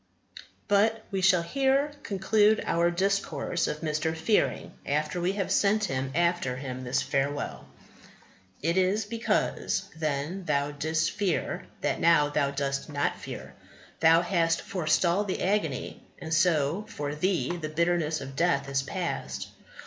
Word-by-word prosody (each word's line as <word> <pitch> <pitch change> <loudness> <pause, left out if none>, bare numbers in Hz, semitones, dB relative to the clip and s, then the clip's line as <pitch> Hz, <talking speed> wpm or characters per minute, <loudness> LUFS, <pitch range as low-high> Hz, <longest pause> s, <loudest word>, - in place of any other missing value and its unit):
But 220 +2 +2
we 195 -1 -1
shall 180 -2 +4
here 275 - +1
conclude 210 0 +2
our 170 +1 +2
discourse 175 -3 0
of 150 - -4
Mr. 160 0 -1
Fearing 160 - +1
after 150 +4 -1
we 180 +2 +1
have 195 -2 -2
sent 210 -1 +2
after 135 +1 0
him 130 -1 -6
this 125 +1 0
farewell: 140 +1 -2 1.0
"It 170 +3 +1
is 195 +3 +1
because 230 +2 -1
Then 155 +4 -2
thou 145 -2 0
didst 155 +2 0
fear, 200 -5 -2
that - - 0
now 165 -3 +4
thou 140 -1 +1
dost 140 +1 -2
not 145 -1 -1
fear. 65 +1 -8 0.5
Thou 165 +1 +5
hast 170 -2 +1
forestalled 175 +3 +1
the 185 - -2
agony, 180 -9 -1 0.2
and 160 -1 -5
so 160 +3 +2
For 145 0 -4
thee 175 +2 0
the 155 -3 -5
bitterness 165 -1 0
of 135 0 -8
death 140 -4 +1
is 135 -1 +1
past. 135 - -4
165 Hz, 140 wpm, -28 LUFS, 145-190 Hz, 1.0 s, Thou